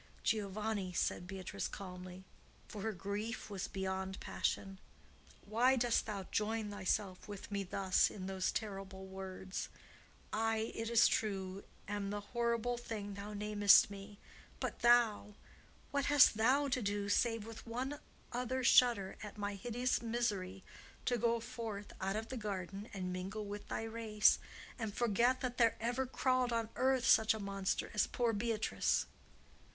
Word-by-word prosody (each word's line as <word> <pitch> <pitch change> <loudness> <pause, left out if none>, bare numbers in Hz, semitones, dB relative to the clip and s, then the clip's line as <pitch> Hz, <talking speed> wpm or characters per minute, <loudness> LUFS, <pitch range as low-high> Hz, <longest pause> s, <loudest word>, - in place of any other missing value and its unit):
"Giovanni," 210 -2 -1
said 175 0 0
Beatrice, 190 -1 -4
calmly, 185 -1 -8 0.4
for 210 - -7
her 220 +3 -1
grief 205 +4 -4
was 195 -2 -3
beyond 190 0 -3
passion, 195 -1 -2 0.7
"why 240 +5 +4
dost 240 -2 +2
thou 200 -3 -3
join 215 0 -1
thyself 195 -1 -1
with 205 -1 -8
me 200 0 -1
thus 190 0 +2
in 190 -3 -7
those 190 -1 -1
terrible 195 -3 -5
words? 190 0 -6 0.6
I, 225 0 0
it 225 0 -3
is 235 -1 +6
true, 195 -2 -1 0.2
am 205 -1 -2
the 205 0 -2
horrible 235 +2 -1
thing 210 -4 -5
thou 200 +1 -7
namest 205 -1 +5
me. 200 +1 -9 0.4
But - - -3
thou,—what 240 +3 +1
hast 290 -5 +7
thou 260 +6 +3
to 255 -1 0
do, 205 -1 -1
save 225 +1 +2
with 225 +1 -10
one 260 +5 -3 0.3
other 250 +1 -1
shudder 230 -6 +5
at 210 0 -8
my 205 0 -2
hideous 245 +5 -1
misery 205 -5 -2 0.4
to 245 -2 +1
go 235 +1 +2
forth 225 -4 -6
out 195 +1 0
of 220 +1 -3
the 260 - -4
garden 200 -1 -4
and 185 -2 -3
mingle 195 +4 -4
with 205 0 -7
thy - - -3
race, 225 -1 +3 0.4
and 220 -3 -3
forget 240 +2 +2 0.2
there 230 -1 +5
ever 245 +3 -1
crawled 255 -1 +1
on 230 -1 0
earth 260 -2 +2
such 220 -1 +6
a - - -5
monster 195 -1 -2
as 210 - +2
poor 235 -2 0
Beatrice?" 220 0 +1
210 Hz, 145 wpm, -36 LUFS, 195-235 Hz, 0.7 s, hast